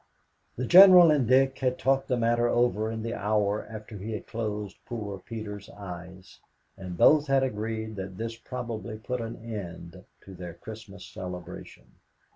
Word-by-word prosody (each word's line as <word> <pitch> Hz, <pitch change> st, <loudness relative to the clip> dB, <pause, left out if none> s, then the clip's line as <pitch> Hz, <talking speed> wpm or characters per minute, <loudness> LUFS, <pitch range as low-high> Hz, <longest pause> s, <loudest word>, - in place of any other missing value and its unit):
The 130 Hz, -, -3 dB
General 180 Hz, 0 st, +9 dB
and 140 Hz, -6 st, +2 dB
Dick 135 Hz, +2 st, +3 dB
had 130 Hz, -1 st, 0 dB
talked 135 Hz, +1 st, +1 dB
the 125 Hz, -, 0 dB
matter 120 Hz, 0 st, +2 dB
over 120 Hz, -2 st, +1 dB
in 110 Hz, -1 st, -5 dB
the 115 Hz, 0 st, -3 dB
hour 105 Hz, -1 st, 0 dB
after 110 Hz, -1 st, -9 dB
he 110 Hz, +4 st, -5 dB
had 105 Hz, -, -5 dB
closed 105 Hz, -3 st, -4 dB
poor 105 Hz, -5 st, -6 dB
Peter's 105 Hz, 0 st, -7 dB
eyes, 95 Hz, -1 st, -10 dB, 0.4 s
and 90 Hz, -2 st, -8 dB
both 150 Hz, -, +5 dB
had 135 Hz, -1 st, +3 dB
agreed 110 Hz, -2 st, -3 dB
that 95 Hz, -1 st, -6 dB
this 115 Hz, 0 st, -4 dB
probably 115 Hz, -2 st, -6 dB
put 120 Hz, +3 st, -4 dB
an 115 Hz, 0 st, -5 dB
end 90 Hz, -4 st, -7 dB, 0.2 s
to 95 Hz, -, -12 dB
their 90 Hz, -2 st, -8 dB
Christmas 105 Hz, -2 st, -10 dB
celebration. 90 Hz, -1 st, -8 dB
110 Hz, 160 wpm, -27 LUFS, 100-120 Hz, 0.4 s, General